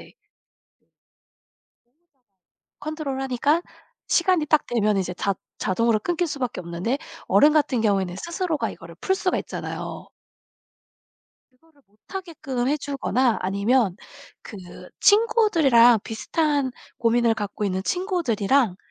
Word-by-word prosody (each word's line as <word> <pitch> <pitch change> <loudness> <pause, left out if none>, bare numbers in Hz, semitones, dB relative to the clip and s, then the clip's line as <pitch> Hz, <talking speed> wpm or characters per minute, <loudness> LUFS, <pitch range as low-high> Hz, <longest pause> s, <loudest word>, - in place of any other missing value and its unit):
보호자가 - - -16 2.7
...컨트롤하니까 285 0 -1 0.5
시간이 345 -2 +2
딱 305 0 +2
되면 215 -3 +1
이제 185 -2 -2
자 195 +2 -1 0.2
자동으로 225 +3 +1
끊길 350 +4 -1
수밖에 255 - -3
없는데 175 +10 -2 0.3
어른 295 +2 +5
같은 290 -6 +2
경우에는 195 -4 +1
스스로가 340 - -2
이거를 - - -12
풀 380 - +1
수가 380 -1 0
있잖아요. - - -6 1.4
그거를 285 +3 -30
못 205 +2 -34
하게끔 280 -10 -4
해 295 - +2
주거나 265 -4 0
아니면 200 +1 +1 0.5
그 215 - -10 0.4
친구들이랑 335 - +5
비슷한 285 +4 -1 0.3
고민을 235 0 +2
갖고 205 -1 -4
있는 190 -1 -1
친구들이랑 270 - +1
260 Hz, 280 characters per minute, -24 LUFS, 215-315 Hz, 2.7 s, 어른